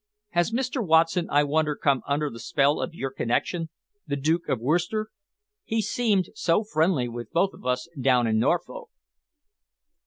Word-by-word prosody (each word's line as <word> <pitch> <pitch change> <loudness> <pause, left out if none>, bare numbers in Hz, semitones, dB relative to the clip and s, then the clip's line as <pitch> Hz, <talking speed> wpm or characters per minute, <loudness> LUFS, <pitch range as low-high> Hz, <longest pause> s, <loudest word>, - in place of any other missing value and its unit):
Has 175 +4 +1
Mr. 255 +1 -1
Watson, 165 0 +3
I 145 +1 +4
wonder 150 +1 +1
come 140 -2 +1
under 145 +1 0
the 115 - -9
spell 140 +5 +1
of 170 - -4
your 135 -4 -4
connection, 160 +7 -1 0.4
the 140 - -1
Duke 160 +4 0
of 125 - 0
Worcester? 175 - 0 0.5
He 225 - -1
seemed 210 -2 +1
so 210 -1 +1
friendly 160 - +1
with 120 0 -7
both 195 +3 +1
of - - -10
us 125 +4 -1
down 125 -2 +3
in 110 -1 +1
Norfolk." 175 - -1
160 Hz, 160 wpm, -25 LUFS, 135-185 Hz, 0.5 s, I